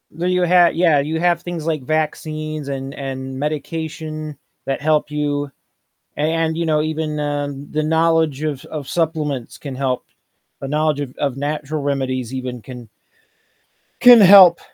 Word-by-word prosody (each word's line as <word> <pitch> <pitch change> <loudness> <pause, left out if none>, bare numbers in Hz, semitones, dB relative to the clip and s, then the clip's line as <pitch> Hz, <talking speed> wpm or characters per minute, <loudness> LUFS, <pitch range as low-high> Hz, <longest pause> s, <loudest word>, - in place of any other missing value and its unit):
Do 170 - -3
you 180 0 +2
ha 175 0 +6
yeah, 165 -3 +3
you 155 +3 -2
have 170 -1 +2
things 170 -3 -6
like 155 -4 -1
vaccines 155 0 -3
and 135 0 -5
and 130 -1 -6
medication 155 0 -5 0.3
that 135 0 -2
help 150 0 +1
you 145 -1 -2 0.7
a - - -5
and, 160 0 0
you 170 - -1
know, 155 -1 +2
even, 155 -1 -3
uh, 145 -1 -2 0.2
the 155 0 -1
knowledge 160 -2 +1
of 150 -4 -3
of 150 -4 -7
supplements 150 -7 -2
can 140 -3 -7
help. 130 -1 -2 0.5
The 135 - -5
knowledge 150 0 0
of 130 -3 -6
of 140 -3 -1
natural 150 +1 -3
remedies 130 -3 -2
even 125 -2 -5
can 125 -2 -10 1.1
can 245 -2 +9
help. 185 -3 +9
150 Hz, 155 wpm, -19 LUFS, 140-160 Hz, 1.1 s, can